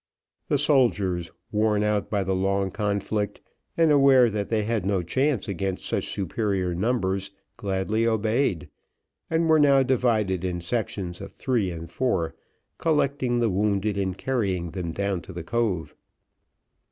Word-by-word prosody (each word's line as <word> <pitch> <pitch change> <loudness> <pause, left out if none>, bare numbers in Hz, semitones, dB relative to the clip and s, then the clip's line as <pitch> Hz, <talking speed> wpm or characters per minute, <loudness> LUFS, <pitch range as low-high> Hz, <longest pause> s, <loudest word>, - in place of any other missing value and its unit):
The 145 - +2
soldiers, 105 - +2 0.2
worn 105 -1 +2
out 105 -1 0
by 100 -2 0
the 95 0 -1
long 95 +1 0
conflict, 105 0 -2 0.4
and 165 -2 +4
aware 135 -4 +6
that 105 -1 -3
they 110 -2 +1
had 110 -2 -1
no 95 -2 0
chance 130 - 0
against 95 -1 -3
such - - -2
superior 95 -1 -1
numbers, 95 -1 0 0.3
gladly 100 +3 -1
obeyed, 110 - 0 0.6
and 165 0 +1
were 160 -1 +5
now 140 -2 +5
divided 110 -8 +1
in 90 -1 -2
sections 90 -2 -3
of - - -8
three 120 -8 0
and 85 -1 -6
four, 85 -3 -1 0.5
collecting 140 -6 +1
the 115 -1 +2
wounded 100 +1 0
and 95 -1 -2
carrying 95 -10 -1
them 90 -2 -4
down 100 0 -2
to 95 - -11
the 85 -1 -6
cove. 105 -4 -1
105 Hz, 145 wpm, -25 LUFS, 95-120 Hz, 0.6 s, aware